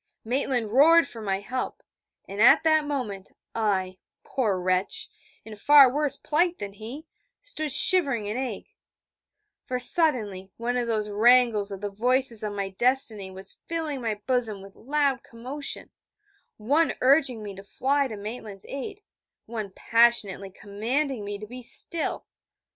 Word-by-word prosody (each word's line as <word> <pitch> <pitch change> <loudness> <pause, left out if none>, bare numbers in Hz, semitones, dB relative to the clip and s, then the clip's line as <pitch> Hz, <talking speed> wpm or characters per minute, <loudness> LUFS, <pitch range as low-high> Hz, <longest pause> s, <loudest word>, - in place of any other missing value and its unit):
Maitland 245 -2 -1
roared 315 +5 +6
for 230 -4 -10
my 195 -2 -1
help: 255 +5 -5 0.4
and 200 +2 -4
at 235 - +7
that 315 -1 +3
moment, 220 -10 -5 0.2
I, 190 -4 -1 0.2
poor 215 -8 -1
wretch, 185 +1 -1 0.4
in 220 -1 -9
far 275 +3 +6
worse 295 -1 0
plight 340 +3 0
than 200 -1 -7
he, 235 +10 -9 0.4
stood 310 - -4
shivering 280 - +3
in 210 +2 -3
ague: 255 0 -4 1.0
for 250 - -3
suddenly 240 - +1
one 240 +2 -2
of 245 -1 -1
those 215 -2 -2
wrangles 225 -1 +4
of 195 -1 -7
the 205 -1 -4
voices 245 +2 +1
of 210 - -3
my 200 -1 -3
destiny 220 -2 0
was 190 +1 -6
filling 315 -5 -3
my 225 -3 -2
bosom 230 -6 0
with 195 0 -14
loud 280 -1 0
commotion, 260 +5 -6 0.7
one 285 +10 +1
urging 260 -4 +3
me 205 -1 -7
to 195 - -10
fly 275 +7 0
to 220 -4 -7
Maitland's 210 -1 -8
aid, 400 +10 -7 0.4
one 220 -3 -5
passionately 230 -5 +2
commanding 225 +6 -3
me 205 0 -5
be 225 +5 -9
still. 325 +6 +1
235 Hz, 145 wpm, -26 LUFS, 205-275 Hz, 1.0 s, at